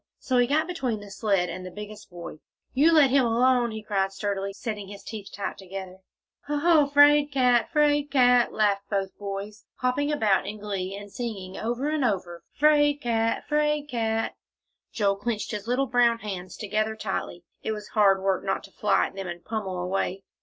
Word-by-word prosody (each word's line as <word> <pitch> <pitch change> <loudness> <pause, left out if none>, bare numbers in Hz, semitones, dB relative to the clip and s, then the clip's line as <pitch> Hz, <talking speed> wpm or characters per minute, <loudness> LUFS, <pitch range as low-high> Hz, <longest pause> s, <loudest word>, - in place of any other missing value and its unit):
So 255 -2 0
he 245 - +4
got 305 +4 +2
between 270 -11 -2
the 205 -1 -11
sled 195 -3 +1
and 180 +2 -6
the 185 - -6
biggest 210 +2 -9
boy. 170 -3 -9 0.3
"You 295 +6 +5
let 295 -5 +6
him 275 -1 +4
alone!" 240 +1 +3
he 220 -1 -6
cried 195 -2 0
sturdily, 195 0 -3
setting 205 0 -5
his 200 0 -10
teeth 205 -3 -7
tight 200 - -5
together. 190 -1 -8 0.5
"Hoh 295 0 -1
hoh 310 -1 +4
'fraid 290 +1 +5
cat 250 -3 +3
'fraid 295 -1 +2
cat!" 250 -3 +4
laughed 200 -2 +1
both 195 -2 -2
boys, 200 +1 -6
hopping 270 +4 0
about 205 -10 +2
in 210 +1 -5
glee, 195 -2 -4
and 205 0 -11
singing 195 -6 -5
over 240 +5 -2
and 305 -2 0
over, 180 -7 -2
'"Fraid 290 -1 +4
cat 230 -3 0
'fraid 300 -1 +1
cat!" 225 -3 -1 0.6
Joel 200 -2 +1
clenched 215 0 -3
his 210 0 -5
little 250 +3 +1
brown 245 -2 +3
hands 190 -5 -6
together 215 +1 -1
tightly. 190 -4 -4 0.2
It - - -2
was 210 -2 -6
hard 195 -2 +3
work 195 -1 +1
not 195 - -1
to 195 - -13
fly 210 0 +2
at - - -7
them 195 -1 -6
and 175 0 -7
pommel 205 -5 -3
away. 190 +1 -2
215 Hz, 190 wpm, -26 LUFS, 195-255 Hz, 0.6 s, let